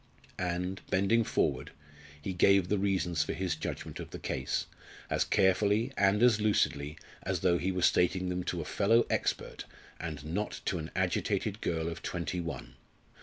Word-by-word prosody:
And, 90 +1 -2
bending 100 +5 +3
forward, - - 0 0.5
he 95 +6 -4
gave 95 0 +4
the 105 - +2
reasons 90 -5 +1
for - - -3
his 90 -2 -1
judgment 80 - -5
of - - -7
the - - -7
case 65 0 -2 0.5
as - - +3
carefully 105 +6 +2
and 100 +3 +3
as 115 -4 +5
lucidly 75 -8 +1 0.2
as 95 -3 -2
though 85 -1 +3
he 95 - 0
were 90 -1 -2
stating 90 +1 +3
them 90 0 -2
to 85 - -2
a - - -6
fellow 115 +8 +3
expert, - - -1 0.3
and 75 -4 -5
not 95 +7 -3
to 90 - 0
an 80 +1 -5
agitated 100 +2 0
girl 80 -1 -1
of 85 +1 -5
twenty 90 0 -3
one. 85 -1 -6
90 Hz, 170 wpm, -31 LUFS, 85-100 Hz, 0.5 s, as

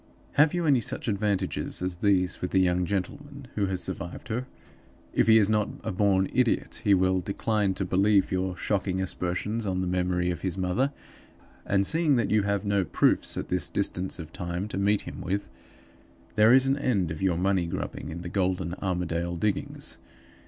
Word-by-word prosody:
"Have 150 +3 +4
you 175 -1 0
any 135 -5 +4
such 130 +2 -2
advantages 100 -2 -1
as 90 -1 -2
these 90 -1 +1
with 90 - -2
the 95 - +2
young 90 -1 +2
gentleman 140 +8 -4
who 100 -2 0
has 95 -1 -1
survived 90 +3 -6
her? 125 +4 -2 0.7
If - - +2
he 110 0 +7
is 105 -3 +5
not 105 -1 +1
a - - -2
born 95 0 +2
idiot 125 -2 +1
he 100 -2 +5
will 95 0 +2
decline 100 0 -1
to 95 - -1
believe 100 +2 +3
your 95 -1 -1
shocking 95 -2 -1
aspersions 95 +4 -2
on 95 -1 -1
the - - -1
memory 90 0 0
of 85 - -5
his 95 -1 -3
mother; 95 +10 0 0.8
and 100 0 +2
seeing 160 - +2
that 115 -4 0
you 110 0 +4
have 100 0 -1
no 100 -1 +2
proofs - - +2
at - - -4
this 90 -5 0
distance 95 +1 -2
of 80 -2 -9
time 90 +3 -3
to - - -4
meet 100 +1 +2
him - - -8
with 100 +3 -2 0.9
there 110 +2 +5
is 130 +1 +6
an 135 +1 +1
end 100 - 0
of 80 - -6
your 95 -3 +1
money 95 -1 +1
grubbing - - -5
in 85 +2 -6
the - - -5
golden 90 -2 -1
Armadale 85 -2 -2
diggings. 100 +4 -2
95 Hz, 190 wpm, -27 LUFS, 90-105 Hz, 0.9 s, he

